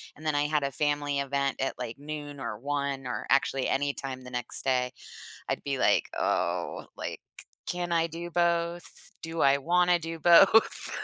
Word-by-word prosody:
and 155 - -14
then 155 -2 +1
I 145 - +2
had 150 0 +1
a 140 - -1
family 145 0 0
event 140 0 -1
at 135 - -1
like 125 -1 -5
noon 145 -1 -7
or 105 -4 -5
1 140 -1 -2
or 125 - -4
actually 135 -1 +2
anytime 135 -2 -2
the 125 - -10
next 125 -1 -4
day, 125 -1 +1 0.6
I'd - - -2
be 140 -1 -2
like, - - +3
"Oh," - - -1
like, - - -5 0.4
"Can 175 -1 -2
I 165 0 +2
do 170 +1 -7
both? 170 +1 -1
Do 165 0 -5
I 140 0 +5
wanna 175 +3 +3
do 165 0 -6
both?" 175 +7 +5
145 Hz, 175 wpm, -28 LUFS, 135-165 Hz, 0.6 s, I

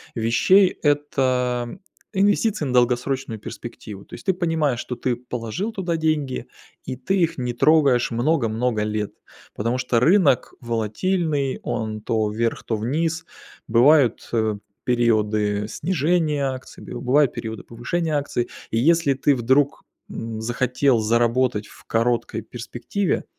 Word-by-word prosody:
вещей- 120 - +4 0.2
это 130 -3 0 0.4
инвестиции 205 -1 +2
на 130 - -2
долгосрочную 125 -1 +1
перспективу. 105 -2 -9
То - - -19
есть - - -13
ты 190 - +3
понимаешь, 160 -7 0
что 125 - -4
ты 120 +1 -1
положил 125 - -4
туда 175 -5 -2
деньги, 155 -4 -1 0.4
и - - -4
ты 130 +10 -1
их 165 -2 +1
не 125 -1 -2
трогаешь 140 -2 +4
много-много 115 -3 +1
лет. 105 -1 -2 0.4
Потому 115 +4 -1
что 125 -2 +1
рынок 155 - +3
волатильный, 135 - -1
он 110 -2 -3
то 110 -1 0
вверх, 115 +2 -1
то 110 - -2
вниз. 160 +9 -1 0.4
Бывают, 125 +1 +4
э, 110 -2 +1 0.3
периоды 105 -4 +1
снижения 155 - 0
акций, 130 0 -10
бив - - -7
бывают 135 +1 +3
периоды 110 0 -6
повышения 155 +8 -3
акций. 140 -4 -1 0.2
И - - 0
если 155 +3 +3
ты 140 +2 +2
вдруг, 130 +4 +2 0.3
м, 115 -1 -5
захотел 125 +2 +1
заработать 115 0 +1
в - - -16
короткой 115 +1 0
перспективе, 125 - -3
125 Hz, 130 wpm, -23 LUFS, 115-150 Hz, 0.4 s, вещей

